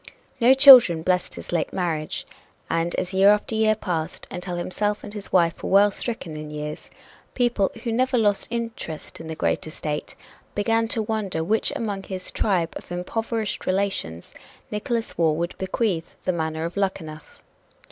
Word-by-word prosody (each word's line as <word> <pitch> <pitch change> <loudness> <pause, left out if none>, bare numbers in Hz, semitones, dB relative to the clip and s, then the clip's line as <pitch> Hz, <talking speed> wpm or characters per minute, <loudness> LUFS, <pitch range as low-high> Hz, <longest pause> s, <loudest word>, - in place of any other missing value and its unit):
No 250 +2 +6
children 250 - +9
blessed 180 0 0
his - - -8
late 170 -3 0
marriage, 165 -5 -2 0.5
and 165 +1 0
as 185 +1 -3
year 195 +1 +6
after 210 +2 +2
year 220 0 +3
passed, 175 -5 -4
until 180 0 -4
himself 205 +4 -2
and 205 - -8
his 205 -2 -5
wife 170 -3 +2
were - - -4
well 200 +1 +5
stricken 195 -7 -3
in 150 0 -7
years, 150 0 -6 0.5
people, 240 -6 +2
who 235 - -2
never 255 +2 +1
lost 205 -3 +1
interest 230 -9 -5
in 165 - -9
the 160 - -5
great - - -1
estate, 150 -1 -5 0.4
began 225 +2 +1
to 225 -1 0
wonder 210 -5 -2
to 160 - 0
which 215 +6 +1
among 205 -4 -3
his 190 -1 -5
tribe 175 -5 0
of - - -13
impoverished 220 +4 -3
relations 185 - -2 0.4
Nickolas 230 0 -2
Waugh 160 -2 +4
would 170 +3 -3
bequeath 190 -3 -2
the 185 - +1
manor 160 -1 -2
of 170 - -5
Luckenough. 160 -6 -4
190 Hz, 170 wpm, -24 LUFS, 165-220 Hz, 0.5 s, children